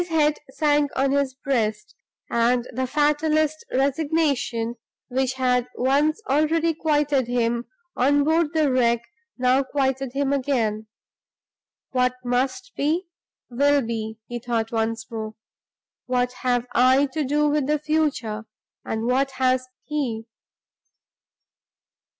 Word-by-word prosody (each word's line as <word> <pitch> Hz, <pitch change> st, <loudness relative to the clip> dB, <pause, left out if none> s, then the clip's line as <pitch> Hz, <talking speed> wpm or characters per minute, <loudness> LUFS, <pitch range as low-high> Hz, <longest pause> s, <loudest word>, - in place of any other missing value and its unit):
His 350 Hz, -, -4 dB
head 305 Hz, -2 st, +2 dB
sank 290 Hz, +1 st, +2 dB
on 270 Hz, 0 st, +2 dB
his 280 Hz, -2 st, 0 dB
breast, 220 Hz, -6 st, -1 dB, 0.3 s
and 240 Hz, +1 st, +1 dB
the 260 Hz, +2 st, -1 dB
fatalist 305 Hz, +2 st, +1 dB
resignation 275 Hz, -4 st, 0 dB, 0.3 s
which 260 Hz, 0 st, 0 dB
had 250 Hz, -2 st, +1 dB
once 285 Hz, -, +2 dB
already 320 Hz, +3 st, +2 dB
quieted 295 Hz, -5 st, +1 dB
him 240 Hz, -1 st, 0 dB, 0.3 s
on 285 Hz, +3 st, +3 dB
board 320 Hz, +1 st, +2 dB
the 305 Hz, -3 st, +3 dB
wreck 235 Hz, -2 st, +2 dB, 0.3 s
now 255 Hz, +1 st, +3 dB
quieted 270 Hz, -1 st, -1 dB
him 280 Hz, 0 st, 0 dB
again. 230 Hz, -6 st, 0 dB, 1.0 s
"What 250 Hz, 0 st, +1 dB
must 265 Hz, -, -1 dB
be, 330 Hz, +5 st, 0 dB, 0.4 s
will 285 Hz, +3 st, +3 dB
be," 220 Hz, -1 st, -4 dB
he 240 Hz, 0 st, -5 dB
thought 230 Hz, -2 st, -2 dB
once 225 Hz, 0 st, -1 dB
more. 220 Hz, -1 st, -5 dB, 0.7 s
"What 250 Hz, 0 st, 0 dB
have 245 Hz, -2 st, +1 dB
I 255 Hz, +3 st, +5 dB
to 310 Hz, -, 0 dB
do 295 Hz, +2 st, +2 dB
with 295 Hz, -2 st, +1 dB
the 300 Hz, +1 st, +2 dB
future, 290 Hz, -8 st, -1 dB, 0.4 s
and 225 Hz, 0 st, -3 dB
what 265 Hz, +3 st, +2 dB
has 255 Hz, 0 st, +2 dB, 0.2 s
he?" 255 Hz, -7 st, -3 dB
265 Hz, 120 wpm, -24 LUFS, 240-295 Hz, 1.0 s, I